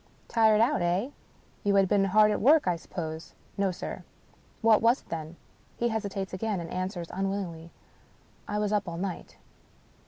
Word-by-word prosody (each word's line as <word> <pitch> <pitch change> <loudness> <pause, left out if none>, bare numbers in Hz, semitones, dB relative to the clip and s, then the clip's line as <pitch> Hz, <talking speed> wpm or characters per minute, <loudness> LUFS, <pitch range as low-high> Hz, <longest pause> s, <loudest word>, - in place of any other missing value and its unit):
"Tired 220 -2 +4
out, 260 +2 +2
eh? 180 +9 0 0.5
You 200 0 +2
had 195 -1 +5
been 200 0 +3
hard 210 +2 +5
at 210 - -1
work, 290 0 +5
I 180 - +2
sup 165 - -14
pose? 160 -3 -6
" - - -32
" - - -32
No, 200 -1 +2
sir." 180 - -6 0.6
"What 220 -1 +5
was 235 +3 +3
it, - - -28
then?" 160 0 -5 0.4
He 235 - +1
hesitates 200 -4 -3
again, 200 +1 -2
and 170 -1 -7
answers 180 -2 -4
unwillingly, 190 -4 -3 0.4
" - - -33
I 210 - -2
was 210 0 0
up 205 -3 0
all 170 - -6
night." 185 0 -5
195 Hz, 190 wpm, -28 LUFS, 175-215 Hz, 0.6 s, had